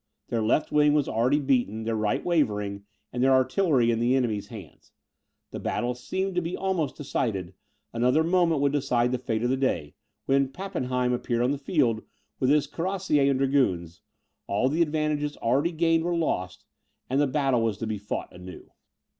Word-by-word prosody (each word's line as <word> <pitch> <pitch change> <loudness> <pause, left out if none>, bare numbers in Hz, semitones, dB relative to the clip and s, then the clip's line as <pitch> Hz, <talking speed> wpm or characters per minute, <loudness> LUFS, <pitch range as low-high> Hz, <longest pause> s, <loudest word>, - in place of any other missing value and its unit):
Their 115 -2 0
left 110 +8 +1
wing 150 0 +4
was 145 -2 +2
already 125 +6 +2
beaten, 120 -6 0
their 115 0 -1
right 105 -1 -1
wavering, 105 - 0 0.3
and 125 - -2
their 135 +1 +4
artillery 130 -2 +3
in 115 - 0
the 120 +2 +2
enemy's 110 -6 -1
hands. 100 -8 -12 0.6
The - - -6
battle 120 0 -1
seemed 190 +10 -3
to 180 - 0
be 165 +1 -4
almost 185 -7 -1
decided; 100 -10 -3 0.4
another 125 +7 +2
moment 170 -3 +2
would 140 -1 +2
decide 125 -4 +1
the 125 - -1
fate 115 -2 -2
of 120 - +1
the 130 - +1
day, 105 - -1 0.3
when 135 0 +2
Pappenheim 130 -8 -2
appeared 120 -1 -1
on 125 - +2
the 140 - -2
field, 135 -8 +1 0.4
with 130 - +2
his 150 0 +4
cuirassiers 165 -3 0
and 135 - +2
dragoons; 125 - 0 0.5
all 105 +6 +1
the 160 +4 0
advantages 150 -2 0
already 140 +9 +1
gained 165 0 +2
were 175 0 0
lost, 100 - -2 0.4
and 135 +3 +1
the 145 - +3
battle 135 -3 +1
was 110 -3 0
to 115 - -4
be 110 -2 -3
fought 105 - -5
anew. 90 0 -11
130 Hz, 180 wpm, -26 LUFS, 115-150 Hz, 0.6 s, wing